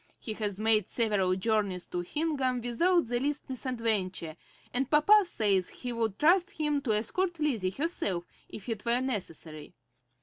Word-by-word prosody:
He 220 - -5
has 205 -2 -4
made 215 -2 +2
several 205 -6 +1
journeys 195 -2 0
to 180 - -4
Hingham 265 - -1
without 340 +10 +2
the 240 +1 -1
least 290 +3 -2
misadventure, 220 - -2 0.4
and 260 +2 0
papa 395 +8 +6
says 200 - +1
he 245 -1 -6
would 225 -4 -1
trust 355 +4 +4
him 295 -2 +1
to 235 -6 0
escort 345 - 0
Lizzie 240 -12 0
herself 195 - -2 0.3
if 205 - -9
it 225 -3 -4
were 235 +1 +4
necessary. 165 - -5
230 Hz, 155 wpm, -29 LUFS, 195-290 Hz, 0.4 s, papa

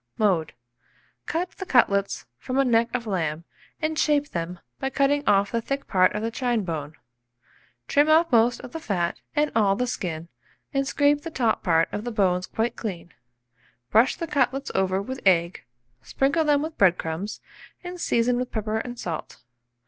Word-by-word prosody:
Mode. 185 -7 +1 0.7
Cut 350 +3 -2
the 385 - -8
cutlets 200 -6 +2
from 255 - -3
a 275 - +4
neck 230 -1 +3
of 240 -2 -2
lamb, 165 -6 -2 0.4
and 310 0 -1
shape 290 -1 +2
them 175 +1 -4 0.2
by 270 - -1
cutting 280 +1 +1
off 200 0 +3
the 230 - 0
thick 275 +4 -3
part 185 0 +3
of 210 - -2
the 225 - -1
chine 240 -3 0
bone. 155 -4 -5 0.9
Trim 290 +2 +3
off 325 +1 +4
most 235 0 +3
of - - -10
the 325 - -5
fat 180 - -2
and 300 0 +2
all 200 -3 +3
the 250 - 0
skin, 170 -9 -4 0.5
and 275 0 0
scrape 290 +1 +2
the 330 - -6
top 245 -8 0
part 165 -3 +3
of 205 - -4
the 240 - -3
bones 185 -4 +1
quite 225 +2 -1
clean. 175 -6 -6 0.8
Brush 230 +5 +4
the 335 - -4
cutlets 275 -3 0
over 190 0 +1
with 260 +5 -6
egg, 170 -2 +2 0.4
sprinkle 280 +4 +1
them 295 -1 +3
with 315 0 -6
bread 185 -3 +5
crumbs, 165 +6 -4 0.4
and 355 0 -7
season 240 +1 +2
with 250 0 -2
pepper 220 0 -2
and 245 +1 -6
salt. 170 -7 -6
230 Hz, 180 wpm, -25 LUFS, 185-275 Hz, 0.9 s, bread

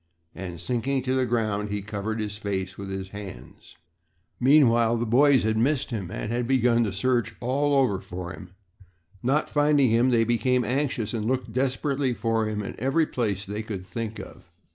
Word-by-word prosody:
and, 90 -3 -7
sinking 130 +5 -1
to 130 0 0
the 130 -1 +1
ground, 110 -3 -1
he 105 -1 -3
covered 105 +1 -4
his 105 -1 -3
face 95 -3 -3
with 100 -1 -7
his 95 0 -5
hands. 100 -1 -10 0.6
Meanwhile, 120 -4 +5
the 120 - -1
boys 130 +3 +4
had 110 0 +1
missed 135 +2 +1
him 100 -7 -4
and 105 - -4
had 120 0 -1
begun 120 -2 +3
to 105 - -2
search 120 +4 0
all 140 +4 +1
over 125 -9 +2
for 90 -1 -7
him. 95 -1 -12 0.7
Not 135 +5 +1
finding 145 -4 +3
him, 120 +3 +4
they 115 -2 +3
became 120 +2 +1
anxious 125 -5 -1
and 110 -2 -2
looked 125 -1 -1
desperately 135 0 0
for 115 +1 0
him 105 -1 -3
in - - -5
every 135 +7 +2
place 105 -8 -2
they 105 +2 -4
could 100 -4 -6
think 115 +2 -5
of. - - -11
115 Hz, 185 wpm, -26 LUFS, 105-130 Hz, 0.7 s, Meanwhile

